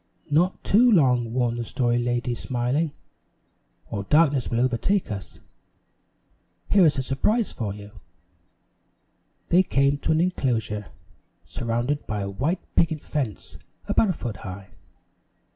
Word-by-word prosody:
"Not 175 +5 +2
too 240 +4 +5
long," 125 - +3
warned 120 -1 0
the - - -2
Story 120 +1 0
Lady, 120 0 -1
smiling, 130 +6 -1 1.0
"or 100 - -2
darkness 145 -1 +3
will 115 - 0
overtake 130 - 0
us. 100 -2 -7 1.3
Here 190 -4 +6
is 145 -2 +1
a 130 - 0
surprise 210 - 0
for 110 -4 -3
you." 105 0 -11 1.6
They 180 - +6
came 140 -5 +1
to - - -1
an 160 - +3
enclosure, 120 - -1 0.6
surrounded 120 +5 -2
by 105 -1 -2
a 100 0 -3
white 150 - -1
picket 160 -2 +2
fence 135 -9 -5 0.3
about 220 - +3
a - - +2
foot 120 - -5
high. 95 0 -9
130 Hz, 130 wpm, -24 LUFS, 115-160 Hz, 1.6 s, Here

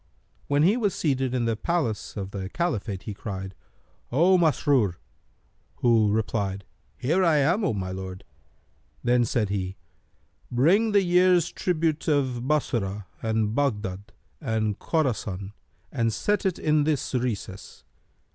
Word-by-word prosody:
When 145 +1 +3
he 200 +8 +4
was 205 -6 0
seated 135 -4 0
in 120 -2 0
the 115 -1 +1
palace 125 - -2
of 100 -1 -4
the 95 -2 -5
Caliphate, 110 - -2
he 105 - -5
cried, 95 -2 -6 0.6
"O 170 +9 +5
Masrur!" 145 - +2 0.8
who 115 -4 +3
replied, 100 -2 -1 0.3
"Here 160 +9 +1
am 165 +5 +3
I, - - +2
O - - 0
my 95 -2 -3
lord!" 95 0 -6 0.8
Then 120 0 +3
said 115 -4 0
he, 95 -1 -3 0.7
"Bring 180 - +3
the 200 -1 +4
year's 180 -1 +4
tribute 160 -3 -1
of 130 -5 0
Bassorah 105 -9 -1 0.2
and 110 -1 0
Baghdad 105 -7 -2 0.3
and 110 -6 -1
Khorasan, 105 - -1 0.4
and 115 -4 0
set 205 - 0
it 185 - -1
in 155 -1 +2
this 150 -3 -1
recess. 115 -6 -4
125 Hz, 135 wpm, -26 LUFS, 105-160 Hz, 0.8 s, O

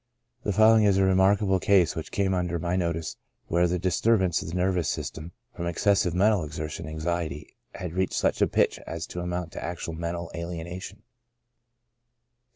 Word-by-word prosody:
The 105 - -1
following 110 +2 +6
is 100 -2 +4
a 95 - +4
remarkable 95 +1 +3
case 95 -4 +3
which 80 - -6
came 95 -1 +1
under 90 -1 -1
my 85 +2 -1
notice, 85 -3 -2 0.3
where 85 +1 +2
the 90 +1 0
disturbance 95 0 +2
of - - -7
the 85 - -5
nervous 90 -2 +1
system, 80 +2 -5 0.2
from 85 - -3
excessive 90 0 +2
mental 100 -1 +3
exertion 75 +2 -5
and 80 - -6
anxiety, 80 -2 -3 0.2
had 90 -2 -5
reached 95 +1 0
such - - +1
a - - +5
pitch - - +1
as 85 +1 -4
to 90 - -7
amount 90 -1 -3
to - - -7
actual 85 0 -4
mental 85 +1 -4
alienation. 85 +4 -6
90 Hz, 170 wpm, -26 LUFS, 85-95 Hz, 0.3 s, following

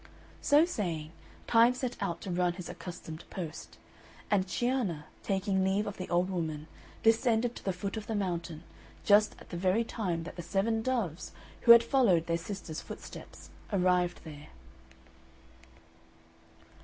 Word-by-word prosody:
So 295 +3 +5
saying, 170 - -3 0.3
Time 235 +2 +5
set 250 -1 -3
out 170 -4 -2
to 190 - -5
run 175 0 +1
his 180 -1 -8
accustomed 170 -2 -8
post; 170 -5 -7 0.5
and 195 -2 +3
Cianna, 220 - -1 0.2
taking 190 0 0
leave 195 +2 +1
of 205 -2 -5
the 185 - -6
old 180 +2 +1
woman, 160 -4 -3 0.4
descended 230 +1 +3
to - - -10
the 195 - 0
foot 195 +3 -4
of 215 - -6
the 225 - -2
mountain, 170 -5 -3 0.4
just 210 +1 +5
at - - -15
the 175 - -4
very 190 +5 +2
time 185 -8 -2
that 170 - -9
the - - -3
seven 210 +6 0
doves, 220 -10 -2 0.4
who - - +14
had 235 0 +10
followed 230 - +3
their 170 0 0
sister's 175 -3 -6
footsteps, 80 0 -10 0.2
arrived 180 -2 +2
there. 150 -2 -10
190 Hz, 150 wpm, -31 LUFS, 170-220 Hz, 0.5 s, who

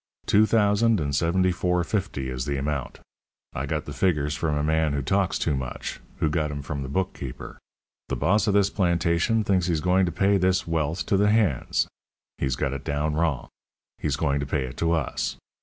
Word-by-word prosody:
Two 110 +1 +4
thousand 110 0 +3
and 70 -2 -1
seventy 90 +4 +2
four 90 0 0
fifty 95 -9 -2
is 65 -1 -3
the 70 -1 -1
amount. 70 -1 -3 0.5
I 70 +3 -3
got 75 +1 -2
the 75 - -6
figures 75 -1 +1
from 75 -2 -1
a 75 - 0
man 80 -1 +1
who 70 -1 -1
talks 95 +5 +1
too 75 - 0
much, 65 -1 -5 0.2
who - - +1
got 75 0 0
'em 70 -1 -5
from 70 0 -4
the 65 - -5
bookkeeper. 70 -5 -4 0.5
The - - 0
boss 100 - +2
of 100 - +2
this 100 0 +3
plantation 85 +3 +1
thinks 95 -4 +1
he's 85 -3 +1
going 90 +3 +2
to - - -1
pay 95 +4 +2
this 95 0 +2
wealth 80 +1 -1
to 100 - +2
the 105 +1 +3
hands. 105 - +2 0.5
He's 65 -2 0
got 70 - -1
it 70 - -5
down 75 +1 -1
wrong; 80 -4 0 0.5
he's 70 -2 0
going 70 -1 0
to 70 - -3
pay 70 - 0
it 65 - -8
to 85 0 +1
us. 80 -5 -1
80 Hz, 205 wpm, -25 LUFS, 70-95 Hz, 0.5 s, Two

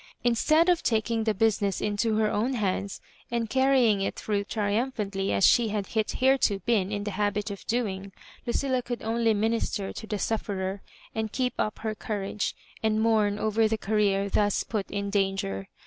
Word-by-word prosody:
Instead 310 +8 +3
of 355 -2 +3
taking 225 0 0
the 220 - +2
business 200 -2 +1
into 210 +2 0
her 215 -1 +2
own 235 +6 0
hands, 200 -2 -2 0.3
and 235 -2 -2
carrying 260 -6 +4
it 195 - -1
through 205 -2 -1
triumphantly 205 -2 -1
as - - +3
she 235 -2 +5
had 210 -2 -2
hitherto 230 +1 +2
been 205 -5 +1
m 205 -1 -2
the 205 - -3
habit 205 +1 -1
of 200 - -9
doing, 200 -5 -2 0.4
Lucilla 260 +1 0
could 240 0 -5
only 225 0 +1
minister 220 -2 -1
to 220 - -8
the 210 - -2
sufiferer, 195 -2 -2 0.3
and 220 -1 -2
keep 250 0 -1
up 215 - -1
her 220 -1 -3
courage, 210 -1 -3 0.3
and 220 -1 +1
mourn 215 -2 +2
over 220 +1 +2
the 220 0 0
Career 200 -2 +1
thus 205 0 +1
put 210 -4 -3
in 200 0 -3
danger. 195 - -1
215 Hz, 170 wpm, -27 LUFS, 200-230 Hz, 0.4 s, she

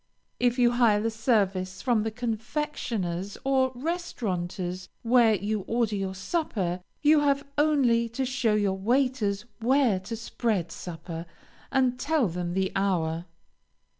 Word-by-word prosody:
If 245 0 +2
you 240 -1 +5
hire 235 -4 +4
the 225 +2 0
service 195 -5 0
from 240 -4 +3
the 220 - -1
confectioner's 220 - -3
or 265 -1 +2
restaurateur's 185 - -3
where 230 -2 +5
you 205 +3 -1
order 230 -2 +1
your 190 -1 -3
supper, 190 - -2 0.2
you 305 +1 +6
have 285 -1 +2
only 265 -6 +3
to 260 +4 -2
show 250 -4 +1
your 200 -2 +1
waiters 235 -2 +1
where 245 -4 +3
to 200 +5 -6
spread 220 -6 -2
supper, 165 -1 -7 0.4
and 255 -2 +2
tell 295 -5 +2
them 175 0 -3
the 190 0 +1
hour. 170 -4 0
225 Hz, 135 wpm, -27 LUFS, 190-255 Hz, 0.4 s, you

